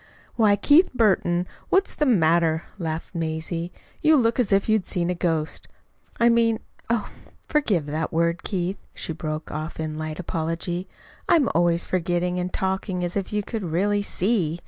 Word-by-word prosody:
"Why, 215 Hz, -3 st, +4 dB
Keith 290 Hz, -, +5 dB
Burton, 180 Hz, -6 st, +2 dB, 0.2 s
what's 390 Hz, +1 st, +2 dB
the 300 Hz, -, 0 dB
matter?" 165 Hz, -6 st, +3 dB, 0.2 s
laughed 165 Hz, 0 st, -4 dB
Mazie. 165 Hz, +1 st, -3 dB, 0.3 s
"You 310 Hz, 0 st, +5 dB
look 230 Hz, -1 st, +2 dB
as 235 Hz, -5 st, +1 dB
if 195 Hz, 0 st, +3 dB
you'd 215 Hz, -3 st, +2 dB
seen 175 Hz, 0 st, 0 dB
a -, -, +1 dB
ghost. 165 Hz, -3 st, -2 dB, 0.5 s
I 235 Hz, -, +5 dB
mean 230 Hz, -1 st, +4 dB, 0.3 s
oh, 230 Hz, -3 st, 0 dB, 0.4 s
forgive 215 Hz, -, +1 dB
that 155 Hz, +2 st, -2 dB
word, 170 Hz, +1 st, +1 dB
Keith," 185 Hz, 0 st, -2 dB, 0.2 s
she 165 Hz, -, -4 dB
broke 155 Hz, -1 st, -5 dB
off 155 Hz, +2 st, -5 dB
in 155 Hz, -1 st, -3 dB
light 155 Hz, +1 st, -4 dB
apology. 170 Hz, +2 st, -3 dB, 0.4 s
"I'm 320 Hz, -, +4 dB
always 170 Hz, 0 st, +2 dB
forgetting, 180 Hz, 0 st, 0 dB
and 180 Hz, +1 st, -2 dB
talking 190 Hz, -1 st, -2 dB
as 175 Hz, -, -4 dB
if 195 Hz, -2 st, -2 dB
you 210 Hz, -1 st, 0 dB
could 225 Hz, +2 st, -4 dB
really 195 Hz, +4 st, +1 dB
SEE. 185 Hz, -5 st, 0 dB
180 Hz, 165 wpm, -24 LUFS, 165-210 Hz, 0.5 s, Keith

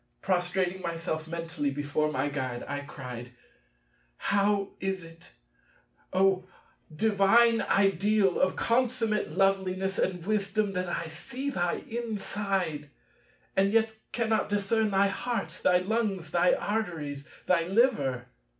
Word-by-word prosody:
Prostrating 185 Hz, 0 st, 0 dB
myself 165 Hz, -2 st, -3 dB
mentally 165 Hz, -3 st, -2 dB
before 145 Hz, +2 st, -1 dB
my 145 Hz, -, 0 dB
Guide, 130 Hz, -4 st, -3 dB
I 145 Hz, 0 st, -3 dB
cried, 125 Hz, -3 st, -8 dB, 0.8 s
"How 200 Hz, 0 st, +1 dB
is 190 Hz, -1 st, -2 dB
it, 165 Hz, +1 st, -14 dB, 0.8 s
O 185 Hz, 0 st, +2 dB, 0.4 s
divine 220 Hz, +6 st, +4 dB
ideal 195 Hz, 0 st, +2 dB
of 185 Hz, 0 st, +2 dB
consummate 230 Hz, -6 st, +1 dB
loveliness 190 Hz, 0 st, +1 dB
and 180 Hz, -3 st, -1 dB
wisdom 210 Hz, 0 st, 0 dB
that 180 Hz, -1 st, -2 dB
I 170 Hz, -, -2 dB
see 250 Hz, -, -5 dB
thy 175 Hz, -7 st, -1 dB
inside, 200 Hz, -, -2 dB, 0.7 s
and 195 Hz, +1 st, +3 dB
yet 220 Hz, 0 st, +3 dB, 0.2 s
cannot 220 Hz, -3 st, 0 dB
discern 205 Hz, +2 st, +1 dB
thy 195 Hz, 0 st, +3 dB
heart, 195 Hz, -5 st, -3 dB
thy 180 Hz, -, +5 dB
lungs, 195 Hz, -4 st, -1 dB
thy 175 Hz, +1 st, +4 dB
arteries, 160 Hz, -10 st, -3 dB, 0.2 s
thy 170 Hz, -2 st, +2 dB
liver?" 185 Hz, -, +2 dB
190 Hz, 115 wpm, -29 LUFS, 165-210 Hz, 0.8 s, thy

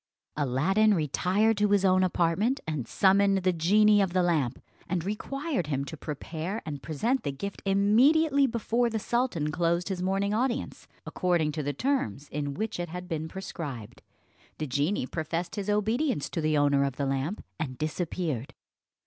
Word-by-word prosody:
Aladdin 170 Hz, +11 st, +2 dB
retired 185 Hz, +8 st, +1 dB
to 210 Hz, 0 st, +2 dB
his 200 Hz, -1 st, +3 dB
own 185 Hz, 0 st, +4 dB
apartment 185 Hz, +9 st, +1 dB
and 150 Hz, -7 st, -3 dB
summoned 195 Hz, 0 st, +3 dB
the 185 Hz, 0 st, +3 dB
genie 205 Hz, +5 st, +4 dB
of 190 Hz, -3 st, 0 dB
the 185 Hz, -1 st, +3 dB
lamp, 150 Hz, -8 st, 0 dB, 0.3 s
and 180 Hz, -3 st, -1 dB
required 275 Hz, -, -3 dB
him 140 Hz, -2 st, -1 dB
to 160 Hz, -, -7 dB
prepare 160 Hz, +6 st, -5 dB
and 145 Hz, -3 st, -5 dB
present 225 Hz, -, -1 dB
the 140 Hz, -, -2 dB
gift 200 Hz, +9 st, -6 dB
immediately, 270 Hz, +9 st, +4 dB
before 235 Hz, 0 st, 0 dB
the 225 Hz, -, -2 dB
sultan 220 Hz, -, -1 dB
closed 170 Hz, +3 st, 0 dB
his 185 Hz, -2 st, -3 dB
morning 195 Hz, +2 st, 0 dB
audience, 250 Hz, +3 st, -2 dB, 0.2 s
according 175 Hz, -4 st, 0 dB
to 155 Hz, +1 st, -3 dB
the 145 Hz, 0 st, -1 dB
terms 150 Hz, -, -1 dB
in 145 Hz, -1 st, -3 dB
which 215 Hz, +2 st, -3 dB
it 175 Hz, -1 st, -3 dB
had 180 Hz, +2 st, -7 dB
been 160 Hz, -3 st, -3 dB
prescribed. 150 Hz, -, -7 dB, 0.6 s
The 155 Hz, -, -3 dB
genie 145 Hz, +4 st, 0 dB
professed 165 Hz, +4 st, -3 dB
his 205 Hz, 0 st, -3 dB
obedience 220 Hz, -, 0 dB
to 165 Hz, -, -2 dB
the 155 Hz, -1 st, +1 dB
owner 145 Hz, -1 st, +3 dB
of 135 Hz, -2 st, -1 dB
the 140 Hz, -, -2 dB
lamp, 135 Hz, +9 st, -2 dB
and 130 Hz, -5 st, -4 dB
disappeared. 155 Hz, -4 st, -3 dB
180 Hz, 165 wpm, -28 LUFS, 150-210 Hz, 0.6 s, own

